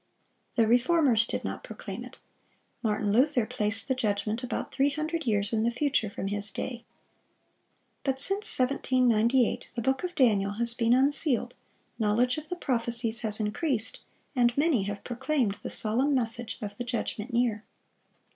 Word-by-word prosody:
The 230 Hz, -, +4 dB
Reformers 245 Hz, -1 st, +3 dB
did -, -, -3 dB
not -, -, -5 dB
proclaim -, -, -7 dB
it. -, -, -11 dB, 0.6 s
Martin 210 Hz, -2 st, 0 dB
Luther 255 Hz, 0 st, +3 dB
placed 210 Hz, 0 st, -1 dB
the 265 Hz, -, +1 dB
judgment 215 Hz, -2 st, -1 dB
about 250 Hz, -, -4 dB
three 275 Hz, +1 st, +2 dB
hundred 310 Hz, +1 st, -3 dB
years 205 Hz, -1 st, +1 dB
in 220 Hz, -, +1 dB
the 230 Hz, -, +2 dB
future 260 Hz, -3 st, 0 dB
from 195 Hz, -1 st, -5 dB
his 205 Hz, 0 st, 0 dB
day. 240 Hz, +3 st, -5 dB, 1.2 s
But 265 Hz, -1 st, -1 dB
since 390 Hz, +9 st, +4 dB
1798 250 Hz, -2 st, +2 dB
the 235 Hz, -, -2 dB
book 265 Hz, +4 st, 0 dB
of 360 Hz, -1 st, -4 dB
Daniel 205 Hz, -6 st, +2 dB
has 235 Hz, +2 st, +1 dB
been 235 Hz, -1 st, +2 dB
unsealed, 275 Hz, 0 st, +1 dB, 0.5 s
knowledge 235 Hz, +6 st, +2 dB
of 310 Hz, 0 st, -13 dB
the 360 Hz, -, -2 dB
prophecies 235 Hz, -6 st, -1 dB
has 215 Hz, -2 st, +1 dB
increased, 220 Hz, +3 st, -1 dB, 0.4 s
and 245 Hz, -1 st, +2 dB
many 285 Hz, -, +2 dB
have 205 Hz, 0 st, -5 dB
proclaimed 245 Hz, -4 st, -1 dB
the -, -, -5 dB
solemn 255 Hz, +7 st, +2 dB
message 235 Hz, -1 st, 0 dB
of 205 Hz, 0 st, -6 dB
the 245 Hz, -, -3 dB
judgment 240 Hz, -1 st, -3 dB
near. 235 Hz, -3 st, 0 dB
240 Hz, 155 wpm, -28 LUFS, 215-265 Hz, 1.2 s, The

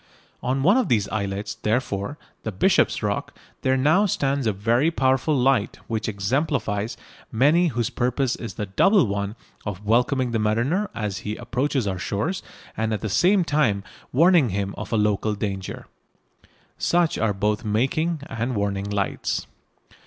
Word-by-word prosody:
On 135 Hz, +2 st, 0 dB
one 195 Hz, -, +5 dB
of 255 Hz, -6 st, +2 dB
the 115 Hz, -7 st, +3 dB
islets, 100 Hz, -1 st, -2 dB
therefore, 110 Hz, +2 st, -2 dB, 0.2 s
the 110 Hz, -, -4 dB
Bishop's 95 Hz, -, +2 dB
Rock, -, -, -2 dB, 0.2 s
there 130 Hz, 0 st, +2 dB
now 160 Hz, +10 st, +4 dB
stands 140 Hz, -, 0 dB
a -, -, +3 dB
very 115 Hz, +9 st, +2 dB
powerful 135 Hz, -1 st, +2 dB
light 130 Hz, -4 st, +2 dB
which 110 Hz, -1 st, -2 dB
exemplifies 110 Hz, 0 st, -1 dB, 0.3 s
many 150 Hz, +9 st, +4 dB
whose 120 Hz, -6 st, -1 dB
purpose 125 Hz, +1 st, 0 dB
is 115 Hz, -, -7 dB
the 105 Hz, -, -3 dB
double 195 Hz, -, +4 dB
one 100 Hz, 0 st, -2 dB, 0.3 s
of 105 Hz, 0 st, -6 dB
welcoming 125 Hz, +3 st, +2 dB
the 115 Hz, -, 0 dB
mariner 120 Hz, -, +1 dB
as 105 Hz, -4 st, -3 dB
he 105 Hz, +1 st, -4 dB
approaches 125 Hz, +2 st, -1 dB
our 95 Hz, -2 st, -2 dB
shores 150 Hz, -, -2 dB, 0.3 s
and 110 Hz, -1 st, 0 dB
at 100 Hz, -, -6 dB
the 110 Hz, -, -2 dB
same 185 Hz, -, +4 dB
time 135 Hz, -11 st, +1 dB, 0.3 s
warning 165 Hz, -1 st, +5 dB
him 100 Hz, 0 st, -2 dB
of -, -, -7 dB
a 115 Hz, -, +2 dB
local 105 Hz, 0 st, +1 dB
danger. 100 Hz, -2 st, -4 dB, 0.9 s
Such 170 Hz, -2 st, +2 dB
are 110 Hz, -2 st, +2 dB
both 105 Hz, +3 st, -1 dB
making 135 Hz, +9 st, 0 dB
and 120 Hz, +2 st, -3 dB
warning 100 Hz, -1 st, -1 dB
lights. 100 Hz, -1 st, -2 dB
115 Hz, 155 wpm, -24 LUFS, 105-140 Hz, 0.9 s, one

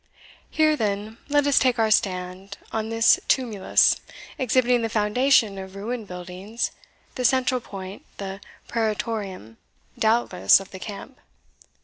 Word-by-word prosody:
Here, 310 Hz, -1 st, +3 dB
then, 215 Hz, -2 st, -3 dB
let 290 Hz, 0 st, +3 dB
us 285 Hz, -2 st, +5 dB
take 250 Hz, -2 st, +2 dB
our 220 Hz, -1 st, +2 dB
stand, 185 Hz, 0 st, -1 dB
on 220 Hz, 0 st, -2 dB
this 225 Hz, +1 st, +4 dB
tumulus, 225 Hz, -7 st, +2 dB, 0.4 s
exhibiting 250 Hz, -1 st, +2 dB
the 225 Hz, -, -1 dB
foundation 215 Hz, 0 st, +2 dB
of 190 Hz, 0 st, -9 dB
ruined 220 Hz, +2 st, -5 dB
buildings, 185 Hz, +5 st, -5 dB, 0.4 s
the 250 Hz, -, -4 dB
central 255 Hz, 0 st, +2 dB
point 195 Hz, -2 st, -9 dB
the 195 Hz, -1 st, -6 dB, 0.3 s
praetorium, 210 Hz, -, -3 dB, 0.4 s
doubtless, 220 Hz, -6 st, +4 dB
of 195 Hz, -, -11 dB
the 190 Hz, -, -9 dB
camp. 210 Hz, +6 st, -9 dB
220 Hz, 125 wpm, -24 LUFS, 195-245 Hz, 0.4 s, us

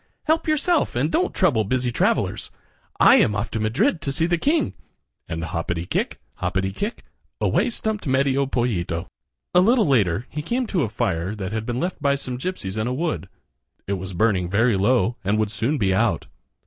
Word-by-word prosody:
Help 320 Hz, +1 st, +1 dB
yourself 310 Hz, -, +1 dB
and 140 Hz, +6 st, +1 dB
don't 360 Hz, -, +1 dB
trouble 130 Hz, -12 st, +2 dB
busy 125 Hz, +3 st, 0 dB
travelers. -, -, 0 dB, 0.5 s
I -, -, +7 dB
am 105 Hz, -, +3 dB
off 105 Hz, +2 st, -2 dB
to 110 Hz, -, -2 dB
Madrid 155 Hz, -, +1 dB
to 140 Hz, -, -1 dB
see 160 Hz, +4 st, +1 dB
the 175 Hz, +1 st, +2 dB
king," 300 Hz, -, +1 dB, 0.6 s
and 80 Hz, +1 st, -3 dB
hoppity 85 Hz, +1 st, -3 dB
kick, -, -, -2 dB, 0.2 s
hoppity 95 Hz, 0 st, -1 dB
kick, 205 Hz, -, -4 dB, 0.4 s
away -, -, +2 dB
stumped 220 Hz, -5 st, -3 dB
Medio 135 Hz, +1 st, +2 dB
Pollito. 95 Hz, -10 st, -1 dB, 0.5 s
A 180 Hz, -, +6 dB
little 230 Hz, +3 st, +4 dB
later 110 Hz, -, +2 dB
he 150 Hz, -, -3 dB
came 245 Hz, +11 st, -1 dB
to 190 Hz, -6 st, 0 dB
a 115 Hz, -, 0 dB
fire 95 Hz, -1 st, -1 dB
that 100 Hz, -2 st, -5 dB
had 110 Hz, 0 st, -3 dB
been 120 Hz, 0 st, -2 dB
left 180 Hz, 0 st, -3 dB
by 140 Hz, -1 st, +3 dB
some 130 Hz, -3 st, -5 dB
gypsies 110 Hz, -, -4 dB
in 110 Hz, -, -1 dB
a 125 Hz, -, -1 dB
wood. 130 Hz, -, -2 dB, 0.6 s
It 100 Hz, -, -2 dB
was 95 Hz, 0 st, -5 dB
burning 90 Hz, -2 st, +1 dB
very 110 Hz, +4 st, +3 dB
low 120 Hz, +4 st, +2 dB
and 100 Hz, +2 st, +1 dB
would 110 Hz, -1 st, 0 dB
soon 120 Hz, +7 st, 0 dB
be 95 Hz, -6 st, +1 dB
out. 95 Hz, -, +1 dB
120 Hz, 190 wpm, -23 LUFS, 100-165 Hz, 0.6 s, I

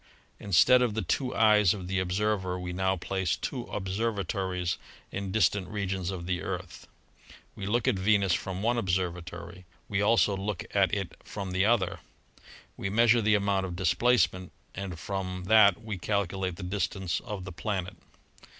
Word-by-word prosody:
Instead 105 Hz, +6 st, +5 dB
of 120 Hz, -4 st, +1 dB
the 110 Hz, -, -1 dB
two 130 Hz, -2 st, -1 dB
eyes 105 Hz, -3 st, +5 dB
of 95 Hz, -3 st, -7 dB
the 95 Hz, 0 st, 0 dB
observer, 95 Hz, 0 st, -1 dB
we 90 Hz, 0 st, -5 dB
now 95 Hz, +1 st, +1 dB
place 95 Hz, 0 st, -1 dB
two 125 Hz, -4 st, -4 dB
observatories 95 Hz, -3 st, -2 dB, 0.3 s
in 95 Hz, -1 st, -4 dB
distant 100 Hz, -2 st, +2 dB
regions 95 Hz, -2 st, -3 dB
of 90 Hz, -3 st, -5 dB
the 90 Hz, 0 st, -1 dB
Earth; 90 Hz, -4 st, -6 dB, 0.7 s
we 95 Hz, -, -5 dB
look 115 Hz, +2 st, +1 dB
at 95 Hz, -, +2 dB
Venus 100 Hz, -2 st, +3 dB
from 95 Hz, +2 st, -3 dB
one 120 Hz, +1 st, +2 dB
observatory, 90 Hz, -1 st, -3 dB, 0.2 s
we 100 Hz, -1 st, 0 dB
also 105 Hz, -1 st, +3 dB
look 95 Hz, -1 st, -3 dB
at 95 Hz, -1 st, +4 dB
it 100 Hz, -3 st, -2 dB
from 100 Hz, -3 st, -6 dB
the 95 Hz, +2 st, +2 dB
other; 110 Hz, -6 st, +1 dB, 0.8 s
we 95 Hz, -, -3 dB
measure 115 Hz, +3 st, +4 dB
the 105 Hz, 0 st, +3 dB
amount 100 Hz, -1 st, +1 dB
of 90 Hz, -2 st, -4 dB
displacement 95 Hz, 0 st, +2 dB, 0.2 s
and 95 Hz, -2 st, -5 dB
from 90 Hz, +1 st, -4 dB
that 100 Hz, 0 st, +5 dB
we 110 Hz, -4 st, -5 dB
calculate 95 Hz, -2 st, -1 dB
the 95 Hz, -, -8 dB
distance 95 Hz, -1 st, -2 dB
of 105 Hz, -5 st, -6 dB
the 95 Hz, -, -6 dB
planet. 95 Hz, 0 st, -3 dB
95 Hz, 160 wpm, -28 LUFS, 90-105 Hz, 0.8 s, Instead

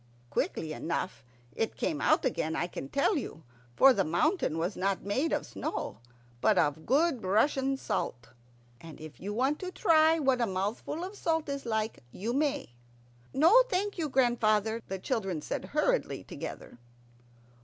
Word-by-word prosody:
Quickly 155 Hz, -1 st, -1 dB
enough 170 Hz, 0 st, -3 dB, 0.3 s
it 225 Hz, -, -2 dB
came 310 Hz, -, -1 dB
out -, -, +3 dB
again, 160 Hz, -10 st, -1 dB
I -, -, 0 dB
can 140 Hz, -6 st, -7 dB
tell 300 Hz, +6 st, +2 dB
you, 165 Hz, -, -6 dB, 0.3 s
for 270 Hz, -, +7 dB
the 195 Hz, -, +1 dB
mountain 175 Hz, -, +1 dB
was 175 Hz, +5 st, -1 dB
not 195 Hz, +1 st, -1 dB
made 265 Hz, +11 st, 0 dB
of -, -, 0 dB
snow -, -, -4 dB, 0.4 s
but -, -, +4 dB
of 150 Hz, +2 st, +1 dB
good 280 Hz, -1 st, +2 dB
Russian 270 Hz, +7 st, +2 dB
salt. 120 Hz, -, -3 dB, 0.5 s
And 165 Hz, -3 st, -11 dB
if 155 Hz, -1 st, -10 dB
you 200 Hz, +3 st, -5 dB
want 265 Hz, +7 st, 0 dB
to 370 Hz, -1 st, -5 dB
try 320 Hz, -2 st, +4 dB
what 265 Hz, -5 st, +2 dB
a 235 Hz, -, +2 dB
mouthful 205 Hz, -, -3 dB
of 385 Hz, +3 st, -6 dB
salt 320 Hz, -5 st, 0 dB
is 280 Hz, -3 st, -4 dB
like, 220 Hz, -1 st, -1 dB
you 220 Hz, -, -3 dB
may. 285 Hz, -, 0 dB, 0.6 s
"No, 335 Hz, -, +6 dB
thank 395 Hz, 0 st, -1 dB
you, 310 Hz, -2 st, -1 dB
grandfather," 230 Hz, -4 st, +2 dB
the 195 Hz, -, -3 dB
children 190 Hz, -3 st, -2 dB
said -, -, -4 dB
hurriedly -, -, 0 dB
together. -, -, -8 dB
235 Hz, 160 wpm, -30 LUFS, 185-300 Hz, 0.6 s, for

